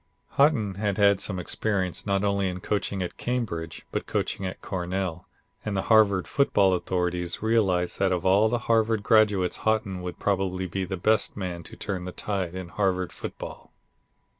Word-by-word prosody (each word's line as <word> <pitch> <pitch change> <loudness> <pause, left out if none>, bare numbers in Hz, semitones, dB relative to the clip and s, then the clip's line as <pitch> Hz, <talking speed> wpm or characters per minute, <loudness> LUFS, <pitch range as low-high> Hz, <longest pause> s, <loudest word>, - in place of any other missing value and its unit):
Haughton 140 -9 +3
had 100 -2 0
had 100 -2 +5
some 95 -2 -2
experience 95 +1 -2
not 100 0 +1
only 100 -1 +1
in 90 0 -5
coaching 100 0 -1
at 90 - -6
Cambridge 100 -10 -3
but - - -3
coaching 95 - -1
at 95 - -6
Cornell, 90 -1 -3 0.4
and 105 -2 -2
the 95 - 0
Harvard 100 -4 +5
football 100 -9 +3
authorities 90 0 -1
realized 95 -6 +1
that 95 -1 +2
of 90 -1 -1
all 100 +4 +5
the 120 - +1
Harvard 110 -2 +2
graduates 105 -5 +3
Haughton 105 -4 0
would 90 -1 -5
probably 95 -2 0
be 95 +2 -3
the 95 +1 -4
best 110 +4 +1
man 90 -3 -4
to - - -11
turn 90 -2 -4
the 90 - -5
tide 95 -3 -3
in 95 -2 -6
Harvard 95 -2 0
football. - - -8
95 Hz, 170 wpm, -26 LUFS, 90-105 Hz, 0.4 s, had